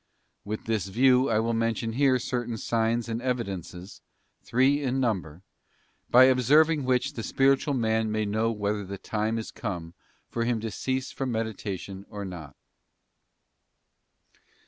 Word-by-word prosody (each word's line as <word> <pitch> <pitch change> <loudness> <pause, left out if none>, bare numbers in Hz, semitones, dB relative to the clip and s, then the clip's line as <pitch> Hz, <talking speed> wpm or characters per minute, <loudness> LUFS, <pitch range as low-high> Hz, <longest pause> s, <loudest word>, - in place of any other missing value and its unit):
With 105 +1 -5
this 110 -4 -1
view 125 +5 +4
I 110 - +2
will 115 +1 +1
mention 115 0 -1
here 135 0 +3
certain 120 -2 -3
signs 115 +1 0
and 115 0 -3
evidences, 100 -7 -4 0.4
three 135 +4 +2
in 135 -1 0
number, 95 - -2 0.7
by 125 +2 +8
observing 140 +4 +4
which 130 +2 +1
the 115 - -5
spiritual 135 +4 +2
man 110 -2 +1
may 110 0 0
know 110 +2 0
whether 105 -1 -2
the 100 +1 -6
time 110 +3 -2
is 110 - -5
come 85 -7 -5 0.3
for 115 - -2
him 115 -1 0
to 110 0 -4
cease 130 +5 -2
from 135 -2 -3
meditation 100 -3 -4
or 100 -1 -6
not. 85 -7 -8
115 Hz, 145 wpm, -27 LUFS, 105-130 Hz, 0.7 s, by